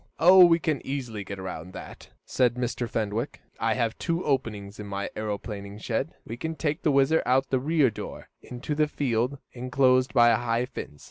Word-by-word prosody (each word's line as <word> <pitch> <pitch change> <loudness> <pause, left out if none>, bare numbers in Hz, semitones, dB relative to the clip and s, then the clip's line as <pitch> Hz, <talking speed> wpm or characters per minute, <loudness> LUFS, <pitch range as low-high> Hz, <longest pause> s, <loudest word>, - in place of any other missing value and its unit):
"Oh, 180 +4 +8
we 170 -1 +6
can 155 -4 -1
easily 125 -7 -4
get 100 0 -7
around 95 -1 -7
that," - - -10 0.2
said 125 -2 +2
Mr. 125 -1 -2
Fenwick. 110 +4 -2 0.2
"I 115 -1 +1
have 115 -1 -1
two 170 0 -1
openings 105 -8 -2
to 105 - -6
my 100 -1 -4
aeroplane 105 -1 -5
shed. 110 - -3
We 115 - -6
can 160 +4 -4
take 155 +2 -2
the 155 - +2
WHIZZER 140 +3 +4
out 130 +1 +3
of - - -44
the 130 - +2
rear 145 -2 +2
door, - - -8
into 125 +4 -5
a 150 - +4
field 130 -2 -1 0.2
enclosed 130 +1 +2
by 120 -2 +6
a 115 - +4
high 120 0 0
fence. 95 - -8
125 Hz, 195 wpm, -26 LUFS, 110-140 Hz, 0.2 s, Oh